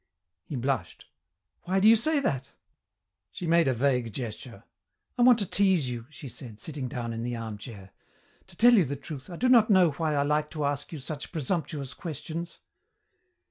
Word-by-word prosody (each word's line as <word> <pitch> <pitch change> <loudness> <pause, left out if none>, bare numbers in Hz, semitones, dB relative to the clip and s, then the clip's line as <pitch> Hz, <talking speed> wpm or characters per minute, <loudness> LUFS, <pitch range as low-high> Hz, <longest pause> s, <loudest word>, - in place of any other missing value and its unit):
He 150 - -6
blushed. 125 -8 -2 0.6
"Why 190 +2 +1
do 200 - +5
you 225 - +9
say 295 +7 +1
that?" 135 - -2 0.8
She 180 - -6
made 170 -1 +4
a 130 - +3
vague 125 -2 +1
gesture. 115 -2 -7 0.5
"I 250 - -1
want 245 -1 +7
to 205 - -1
tease 185 -8 +2
you," 120 -1 -6
she 150 -2 -10
said, 115 -3 -10
sitting 140 +1 -5
down 120 -2 -4
in 115 - -4
the 120 +1 -3
armchair. 105 -3 -8 0.6
"To - - -14
tell 240 +1 +7
you 205 -6 +6
the 140 +1 -3
truth, 140 0 -9
I 175 - -7
do 250 +9 +1
not 235 -4 +6
know 185 -5 +5
why 155 +1 -1
I 140 - +2
like 150 +1 0
to 150 - 0
ask 140 0 -2
you 160 - -5
such 145 +1 -7
presumptuous 150 -4 -3
questions." 170 +1 -6
145 Hz, 185 wpm, -28 LUFS, 125-175 Hz, 0.8 s, you